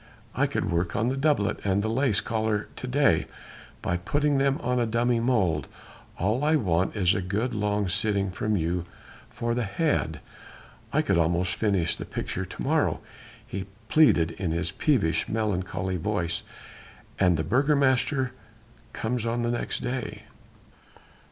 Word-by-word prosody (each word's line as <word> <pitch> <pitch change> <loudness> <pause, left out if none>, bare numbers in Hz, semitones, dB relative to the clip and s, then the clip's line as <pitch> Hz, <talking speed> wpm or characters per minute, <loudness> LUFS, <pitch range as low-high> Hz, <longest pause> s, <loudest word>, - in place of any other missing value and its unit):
I - - +2
could - - -2
work 85 +1 0
on 115 +2 +1
the 130 - -1
doublet 135 -7 +1
and 100 0 +1
the - - 0
lace 120 -1 +2
collar 110 -2 -1
to 130 - -6
day, 125 - +3 0.6
by 90 - 0
putting 145 +10 +1
them 135 0 +2
on 125 0 +1
a 120 - +1
dummy 120 +1 +1
model.... 95 - +1 0.5
All 110 +9 0
I 155 +1 +4
want 95 - +1
is 95 -3 +3
a 95 - -1
good 105 +7 -1
long 105 -1 0
sitting 100 +1 +1
from 105 +2 -1
you 85 +1 -1 0.4
for 120 0 -2
the 120 - 0
head.... 100 - 0 0.7
I - - +2
could - - +2
almost 85 +3 +1
finish 95 -5 +1
the - - -7
picture - - -4
to - - -7
morrow," - - +1 0.5
he 95 0 -5 0.2
pleaded 85 - +5
in 90 +1 -3
his 85 +2 -1
peevish, 100 - +1
melancholy 95 -3 -1
voice, 85 -2 -1 0.8
"and 90 -4 +4
the 80 - 0
Burgomaster 135 - +2 0.6
comes 115 0 -2
on 120 +1 0
the 120 - 0
next 120 - -2
day." 125 0 -4
105 Hz, 155 wpm, -26 LUFS, 90-125 Hz, 0.8 s, pleaded